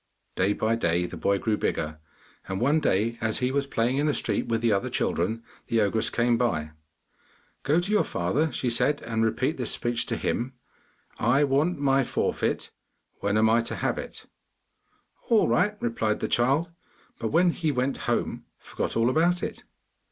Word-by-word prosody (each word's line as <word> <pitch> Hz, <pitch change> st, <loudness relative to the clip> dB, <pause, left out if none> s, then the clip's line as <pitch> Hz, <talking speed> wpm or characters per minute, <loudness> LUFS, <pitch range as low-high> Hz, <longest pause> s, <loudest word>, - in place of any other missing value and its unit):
Day 95 Hz, +3 st, +2 dB
by 110 Hz, +2 st, 0 dB
day 85 Hz, -5 st, +1 dB
the -, -, -7 dB
boy 100 Hz, 0 st, +1 dB
grew 105 Hz, +1 st, 0 dB
bigger, 75 Hz, 0 st, -2 dB, 0.5 s
and 95 Hz, 0 st, -3 dB
one 145 Hz, +7 st, +3 dB
day 115 Hz, -2 st, 0 dB
as 110 Hz, -1 st, +1 dB
he 125 Hz, 0 st, 0 dB
was 140 Hz, 0 st, 0 dB
playing 125 Hz, 0 st, 0 dB
in 145 Hz, +2 st, +1 dB
the 150 Hz, -, +1 dB
street -, -, 0 dB
with 115 Hz, -1 st, 0 dB
the 115 Hz, -1 st, +2 dB
other 100 Hz, -1 st, 0 dB
children, 110 Hz, +7 st, -1 dB, 0.2 s
the 115 Hz, -, +1 dB
ogress 110 Hz, +2 st, +2 dB
came 120 Hz, -1 st, +1 dB
by. 80 Hz, -11 st, 0 dB, 0.9 s
'Go 150 Hz, +4 st, +2 dB
to 185 Hz, +4 st, -2 dB
your 210 Hz, -, +4 dB
father,' 140 Hz, -, 0 dB
she 125 Hz, -, -3 dB
said, 125 Hz, +5 st, +1 dB
'and 110 Hz, -1 st, -1 dB
repeat 130 Hz, +6 st, 0 dB
this 125 Hz, -3 st, -2 dB
speech 120 Hz, -1 st, -1 dB
to -, -, -1 dB
him: 125 Hz, +3 st, -2 dB, 0.7 s
"I 130 Hz, +6 st, +3 dB
want 145 Hz, +5 st, +1 dB
my 135 Hz, -1 st, +2 dB
forfeit; -, -, -1 dB, 0.5 s
when 100 Hz, +1 st, 0 dB
am 110 Hz, +1 st, +4 dB
I 115 Hz, +1 st, +4 dB
to 115 Hz, -, -4 dB
have -, -, -1 dB
it?"' -, -, -8 dB, 1.0 s
'All 225 Hz, -2 st, +4 dB
right,' 210 Hz, 0 st, +2 dB
replied 110 Hz, -2 st, -1 dB
the -, -, -1 dB
child, 140 Hz, +8 st, +1 dB, 0.5 s
but 115 Hz, -, -2 dB
when 170 Hz, +8 st, +3 dB
he 160 Hz, -2 st, -1 dB
went 130 Hz, 0 st, -1 dB
home -, -, -1 dB
forgot -, -, -4 dB
all 115 Hz, +1 st, +3 dB
about 170 Hz, +7 st, +2 dB
it. -, -, -5 dB
120 Hz, 180 wpm, -26 LUFS, 110-140 Hz, 1.0 s, your